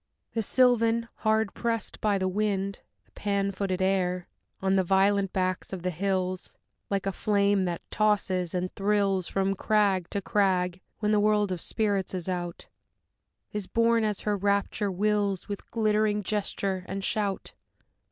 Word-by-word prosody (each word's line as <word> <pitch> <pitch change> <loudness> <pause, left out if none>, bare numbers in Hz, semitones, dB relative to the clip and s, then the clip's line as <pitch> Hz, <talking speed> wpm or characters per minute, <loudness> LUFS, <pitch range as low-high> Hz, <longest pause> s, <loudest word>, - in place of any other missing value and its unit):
The 225 - 0
Sylvan, 230 -1 +3
hard 220 -2 +1
pressed 230 -2 -3
by 210 -2 +2
the 185 -1 0
wind, 200 0 -1 0.3
the - - -33
Pan 200 -1 -1
footed 190 -1 -1
air, 180 -2 0 0.3
On 190 0 +1
the 190 - +3
violent 195 +1 +3
backs 185 0 -1
of 180 -2 -5
the 180 - 0
hills, 185 +1 -2 0.3
Like 195 -1 -1
a 195 - +1
flame 200 -1 +2
that 175 -2 -3
tosses 190 -5 +1
and 180 0 -2
thrills 195 -2 +1
From 195 0 0
crag 195 -3 +1
to 200 - -1
crag 185 -2 +1 0.2
when 210 0 +2
the 210 - +4
world 210 -1 +2
of 180 -2 -3
spirits 200 -4 -1
is 180 -1 -4
out, 175 -2 -4 0.9
Is 210 -3 -3
borne, 230 0 +3
as 210 -2 -1
her 210 -1 0
rapture 200 +1 0
wills, 205 0 0
With 205 -1 -6
glittering 215 -2 +1
gesture 195 -2 -2
and 195 +1 -4
shout. 205 -3 -1
200 Hz, 155 wpm, -28 LUFS, 185-210 Hz, 0.9 s, the